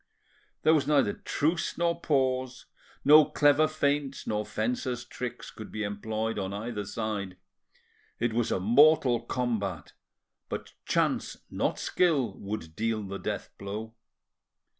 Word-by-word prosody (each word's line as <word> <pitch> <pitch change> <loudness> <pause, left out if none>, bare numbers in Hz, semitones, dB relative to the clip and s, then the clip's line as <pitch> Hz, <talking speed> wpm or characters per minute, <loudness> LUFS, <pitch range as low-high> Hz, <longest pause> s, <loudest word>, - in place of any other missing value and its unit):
There 160 - +6
was 145 -3 +2
neither 140 -9 +3
truce 160 +3 -1
nor 170 0 0
pause, 130 -3 0 0.4
no 150 +2 +9
clever 145 +1 +4
feints 145 -2 -1
nor 105 -1 -2
fencer's 120 +2 -2
tricks 120 0 -6
could 110 - -10
be 110 - -3
employed 110 +2 -2
on 95 0 -3
either 105 0 -4
side; 105 -3 -4 0.8
it 120 -1 0
was 120 0 0
a - - +1
mortal 125 +4 +5
combat, 110 - -2 0.6
but - - -5
chance, - - 0
not - - 0
skill, 145 - +1
would 100 -6 -6
deal 110 -1 -1
the 100 0 -6
death - - -4
blow. 105 +3 -5
120 Hz, 130 wpm, -29 LUFS, 105-140 Hz, 0.8 s, no